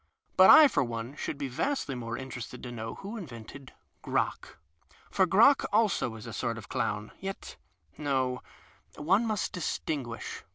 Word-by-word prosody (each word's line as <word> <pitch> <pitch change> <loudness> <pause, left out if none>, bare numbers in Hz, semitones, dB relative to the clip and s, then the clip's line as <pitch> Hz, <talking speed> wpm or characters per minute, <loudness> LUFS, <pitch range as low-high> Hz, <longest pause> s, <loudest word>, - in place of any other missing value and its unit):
IJut - - +9
I 310 - +10
for 270 - +1
one 120 +2 -5
should 145 - -4
be 140 -1 -3
vastly 150 - -2
more 120 -2 -5
interested 130 -3 -7
to 125 - -6
know 115 -1 -6
wlio 210 +4 -7
invented 130 - -10 0.3
Crock. - - -2 0.5
For 190 - +3
Crock 230 +10 +6
also 205 - +2
is 110 +1 -10
a 115 - -7
sort 115 0 -2
of 110 - -10
clown. 105 +1 -2
Yet 195 0 -6 0.4
no; 130 -3 0 0.5
one 195 +10 +2
nuist 215 -2 -1
distinguish. 135 -9 -4
135 Hz, 155 wpm, -29 LUFS, 115-195 Hz, 0.5 s, I